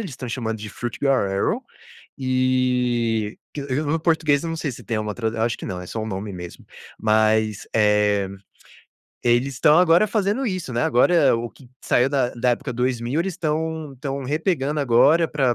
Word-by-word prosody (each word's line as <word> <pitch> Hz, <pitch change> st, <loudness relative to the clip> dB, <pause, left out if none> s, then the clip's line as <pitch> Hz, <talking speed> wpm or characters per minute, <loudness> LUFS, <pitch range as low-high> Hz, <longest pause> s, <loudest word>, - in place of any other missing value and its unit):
eles 195 Hz, -8 st, -5 dB
estão 125 Hz, -1 st, -7 dB
chamando 110 Hz, -2 st, -3 dB
de 105 Hz, 0 st, -7 dB
foot 115 Hz, +1 st, -6 dB
girls 130 Hz, -8 st, +2 dB
erin, 100 Hz, -, 0 dB, 0.6 s
e 125 Hz, -4 st, +1 dB, 0.2 s
que 145 Hz, -, -6 dB
o 145 Hz, +3 st, -1 dB
o -, -, -1 dB
português, 160 Hz, -3 st, +2 dB
eu 165 Hz, -, -3 dB
não 165 Hz, -, -3 dB
sei 155 Hz, -4 st, -3 dB
se -, -, -10 dB
tem 110 Hz, -2 st, -2 dB
uma 105 Hz, -1 st, -4 dB
tradu 115 Hz, -1 st, -2 dB
eu -, -, -1 dB
acho 115 Hz, 0 st, 0 dB
que -, -, -8 dB
não, 90 Hz, -1 st, -5 dB
é 90 Hz, -, -9 dB
só 115 Hz, -, -5 dB
um 110 Hz, -, -3 dB
nome 100 Hz, -1 st, -5 dB
mesmo. 90 Hz, -1 st, -9 dB, 0.4 s
Mas, 110 Hz, -1 st, +2 dB
eh, 105 Hz, -2 st, +3 dB, 1.0 s
eles 120 Hz, +3 st, +2 dB
estão 150 Hz, +5 st, +5 dB
agora 180 Hz, +3 st, +5 dB
fazendo 215 Hz, +5 st, 0 dB
isso, 185 Hz, -, -3 dB
né, 120 Hz, 0 st, -1 dB
agora 165 Hz, +4 st, +4 dB
o 115 Hz, +1 st, -3 dB
que 135 Hz, -, -18 dB, 0.2 s
saiu 125 Hz, +3 st, +2 dB
da 135 Hz, -3 st, +1 dB
da 120 Hz, +1 st, +1 dB
época 130 Hz, +2 st, -2 dB
2000, 125 Hz, +2 st, -1 dB
eles 190 Hz, +1 st, -2 dB
estão 160 Hz, -2 st, -3 dB
estão 135 Hz, +1 st, -4 dB
repegando 150 Hz, 0 st, -1 dB
agora, 145 Hz, +6 st, +4 dB
pra 135 Hz, -6 st, +1 dB
130 Hz, 195 wpm, -22 LUFS, 110-150 Hz, 1.0 s, estão